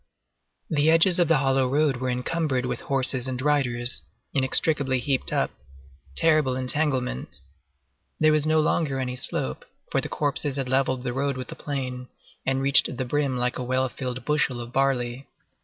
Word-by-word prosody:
The 150 0 +2
edges 170 +2 +5
of 175 - +4
the 165 - +4
hollow 135 -1 +2
road 145 -1 +2
were 130 +1 -2
encumbered 130 +1 -1
with - - -3
horses 130 -1 -1
and 130 -1 -3
riders, 130 -4 0 0.3
inextricably 135 0 +3
heaped 135 +1 0
up. - - +1 0.6
Terrible 155 - +3
entanglement! 130 - -1 0.8
There 155 0 +5
was 155 0 +2
no 155 0 +3
longer 150 -3 0
any 125 -1 -3
slope, 65 - -2 0.3
for - - +1
the - - -6
corpses 145 -1 -1
had 135 -2 -1
levelled 130 -1 +1
the 125 -2 -2
road 140 0 -1
with 130 -1 -6
the - - -7
plain, 130 -3 -5 0.4
and 135 0 +1
reached 135 -2 +4
the 130 - -2
brim 140 0 0
like 125 +1 0
a - - -3
well 130 +1 0
filled 125 0 -5
bushel 145 -4 0
of 120 +1 -7
barley. 130 -1 0
135 Hz, 170 wpm, -25 LUFS, 125-145 Hz, 0.8 s, edges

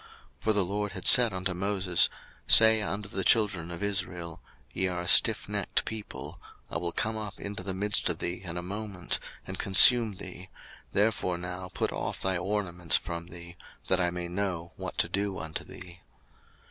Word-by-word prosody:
02:033:005 - - -37
For 110 - +3
the 100 -3 +2
LORD 105 +2 -3
had 95 - -6
said 120 -3 +8
unto 95 0 -3
Moses, 95 -1 +1 0.4
Say 110 0 +7
unto 100 -1 -4
the 95 -1 -2
children 100 -7 +3
of 85 +2 -5
Israel, 90 -4 -3 0.3
Ye 95 - 0
are 90 -1 -3
a - - -7
stiffnecked - - +3
people: 110 -2 -7 0.3
I - - -2
will 85 0 -3
come 110 +4 -2
up 105 -2 -7
into 100 -1 -6
the 95 0 -4
midst 100 +1 +1
of - - 0
thee 90 +1 -4
in 85 -2 -5
a 90 - -4
moment, 100 -1 -4 0.3
and 95 0 -7
consume 110 +2 +6
thee: 90 0 -10 0.4
therefore 100 -4 0
now 90 +1 -7
put - - -2
off - - -4
thy 95 0 0
ornaments 90 -3 -1
from 85 -1 -6
thee, 85 0 -11 0.3
that 95 -1 +2
I 90 - +1
may 90 0 -5
know 90 -2 -4
what - - -7
to - - +3
do 100 -1 -3
unto 80 0 -6
thee. 85 -1 -12
95 Hz, 185 wpm, -28 LUFS, 90-100 Hz, 0.4 s, said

